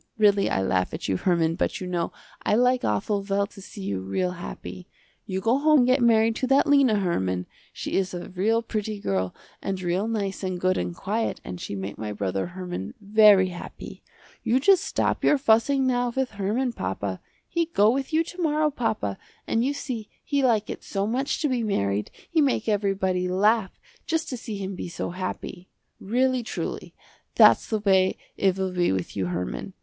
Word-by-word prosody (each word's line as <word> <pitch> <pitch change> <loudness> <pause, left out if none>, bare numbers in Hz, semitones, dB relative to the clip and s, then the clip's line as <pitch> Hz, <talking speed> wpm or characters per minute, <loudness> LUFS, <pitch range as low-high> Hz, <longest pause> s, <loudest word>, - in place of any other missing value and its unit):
Really 205 -2 +4
I 95 - 0
laugh 90 -1 0
at - - -5
you 95 - +1
Herman, 165 - +1
but - - -1
you 185 - -5
know 175 -2 -2 0.3
I - - +2
like 250 +2 +3
awful 200 - 0
well 200 0 0
to 200 0 -14
see 195 +1 -9
you 100 - -2
real 95 - -1
happy. 180 +1 -8 0.4
You 190 -1 -2
go 230 +5 +2
home 305 -1 +5
and 245 - +3
get 255 +1 +3
married 225 -1 +4
to 260 - -1
that 270 +2 +4
Lena, 280 -6 +4
Herman. 95 - 0 0.3
She - - -6
is 190 -1 0
a 175 - -6
real 220 +5 +1
pretty 215 -2 -3
girl 95 - -1 0.3
and 195 -1 -3
real 185 +3 -1
nice 200 -4 -2
and 185 -2 -3
good 185 +1 +2
and 90 -1 -3
quiet 220 +4 -2
and 90 -1 -6
she - - -5
make 95 +1 -6
my 105 -1 -4
brother 95 -2 -2
Herman 180 - -6
very 205 -2 +6
happy. 175 - -9 0.4
You 245 +3 +2
just 375 +5 +5
stop - - -1
your 295 - +5
fussing 265 +2 +3
now 245 -1 +1
with 265 -1 0
Herman, 220 +5 -1
papa. 95 - -3 0.3
He 335 -1 0
go 215 -10 +4
with 270 +3 -2
you 320 +1 +3
to 355 +2 -8
morrow 305 -1 +2
papa, 220 - -2 0.3
and 225 - +1
you 270 - +1
see 255 -7 -5
he 285 -1 0
like 225 -5 +2
it - - -6
so 195 0 -2
much 255 +6 -1
to - - +3
be 255 -3 0
married, 105 - 0 0.2
he 320 - +2
make 265 -6 +1
everybody 195 -3 +1
laugh 205 +2 +2 0.3
just 325 0 -1
to 255 - -4
see 220 -3 -6
him 195 0 -4
be 180 - -6
so 170 - -4
happy. 185 0 -6 0.3
Really 255 +4 +1
truly, 235 - -5 0.4
that's - - +6
the 220 - 0
way 190 -2 +3 0.2
it 190 -1 +2
will 190 -1 -1
be 180 -1 +1
with 95 -2 -3
you 95 -3 -1
Herman. 90 0 -4
200 Hz, 195 wpm, -25 LUFS, 180-245 Hz, 0.4 s, very